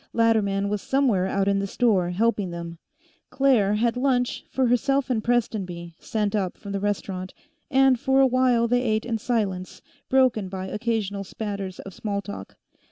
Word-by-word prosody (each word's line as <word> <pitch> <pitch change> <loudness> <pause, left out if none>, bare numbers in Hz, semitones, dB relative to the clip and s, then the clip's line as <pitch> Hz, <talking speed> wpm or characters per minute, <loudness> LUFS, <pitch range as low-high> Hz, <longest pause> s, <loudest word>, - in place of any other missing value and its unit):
Latterman 210 -4 +2
was 205 -1 -2
somewhere 245 -9 +1
out 195 0 0
in 200 0 +2
the 200 - -2
store, 195 -5 +2
helping 205 +1 0
them; 170 -1 -7 0.5
Claire 245 -7 +3
had 230 +2 +1
lunch 250 -1 0
for 265 - +1
herself 270 +3 +1
and 220 -3 0
Prestonby 190 -8 -1
sent 210 -2 -2
up 190 -4 -1
from 200 - -8
the 200 - -2
restaurant, 195 -2 -3 0.3
and 265 -3 +4
for 265 0 +2
a 270 - +7
while 250 -2 +3
they 245 +1 +2
ate 220 -3 0
in 230 -2 -2
silence, 200 -6 -2 0.3
broken 255 -7 +3
by 190 0 -5
occasional 210 -1 -2
spatters 200 -2 -5
of 195 - -10
small 205 0 -3
talk. 200 0 -8
215 Hz, 165 wpm, -25 LUFS, 195-245 Hz, 0.5 s, a